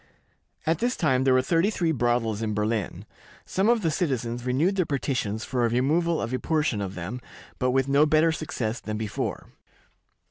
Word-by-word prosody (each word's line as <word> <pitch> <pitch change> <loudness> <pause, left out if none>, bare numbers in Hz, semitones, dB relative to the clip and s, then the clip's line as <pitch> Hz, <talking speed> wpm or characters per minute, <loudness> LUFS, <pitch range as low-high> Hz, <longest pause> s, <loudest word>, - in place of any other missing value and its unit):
At 160 0 +1
this 245 +1 0
time 130 -5 +2
there 130 - +5
were 130 - +3
thirty 165 +7 +2
three 175 -6 0
brothels 120 -5 0
in 110 -2 -1
Berlin. 105 -2 -2 0.4
Some 195 +4 +1
of 235 -3 +3
the 165 - +2
citizens 125 -8 -2
renewed 155 +10 +2
their 185 - +2
petitions 120 -6 -2
for 125 -3 -1
a 115 - +3
removal 155 +8 +1
of 115 +2 -3
a 130 - 0
portion 155 -9 0
of 95 -1 -4
them, 100 +9 -5 0.4
but 125 - +1
with 135 +1 +2
no 140 +2 +4
better 155 +2 +4
success 120 -8 -3
than 110 0 -4
before. 110 -2 -4
130 Hz, 185 wpm, -26 LUFS, 115-160 Hz, 0.4 s, there